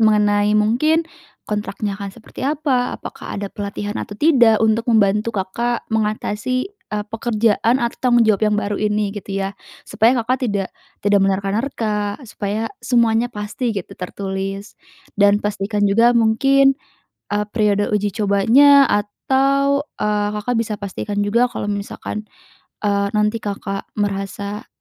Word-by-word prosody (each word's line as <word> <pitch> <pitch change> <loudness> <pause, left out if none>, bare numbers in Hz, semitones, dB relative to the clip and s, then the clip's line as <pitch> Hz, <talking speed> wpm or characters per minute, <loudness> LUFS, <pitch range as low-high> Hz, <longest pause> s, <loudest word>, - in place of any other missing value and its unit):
mengenai 210 -1 +3
mungkin 305 +10 +2 0.4
kontraknya 210 -1 -3
akan 200 - -4
seperti 220 - -13
apa, 280 -4 0
apakah - - -8
ada 200 -1 -5
pelatihan 205 0 -4
atau 205 - -7
tidak, 245 -7 +5
untuk 225 +2 +1
membantu 210 -1 +3
Kakak 235 +6 -2
mengatasi, 220 - -1
eee, 210 - -6
pekerjaan 225 +1 +1
atau 235 -2 -2
tanggung 240 -2 +4
jawab 215 -2 +2
yang 210 - +1
baru 205 0 -2
ini 210 -1 0
gitu 200 -1 -6
ya, 195 - -3 0.3
supaya 235 +4 +2
Kakak 255 0 0
tidak 200 -2 -1 0.4
tidak 205 -1 +4
menerka-nerka, 205 +1 -1
supaya 215 - -4
semuanya 235 -1 +2
pasti 220 +3 -4
gitu 190 - -5
tertulis, 195 +2 -5 0.4
dan 205 +1 +4
pastikan 205 0 -1
juga 230 +4 +4
mungkin, 270 +5 +4 0.6
eee, 210 0 +1
periode 210 0 +1
uji 205 -1 0
cobanya 240 +8 +5
atau, 275 +7 +1 0.2
eee, 210 -1 0
Kakak 245 +4 -2
bisa 220 -2 -1
pastikan 205 +1 -5
juga 235 +5 +2
kalau 205 - -4
misalkan, 205 +1 -5 0.5
eee, 200 -1 +1
nanti 210 +2 +1
Kakak 195 -1 -5
merasa 200 +2 -3
210 Hz, 135 wpm, -20 LUFS, 205-235 Hz, 0.6 s, tidak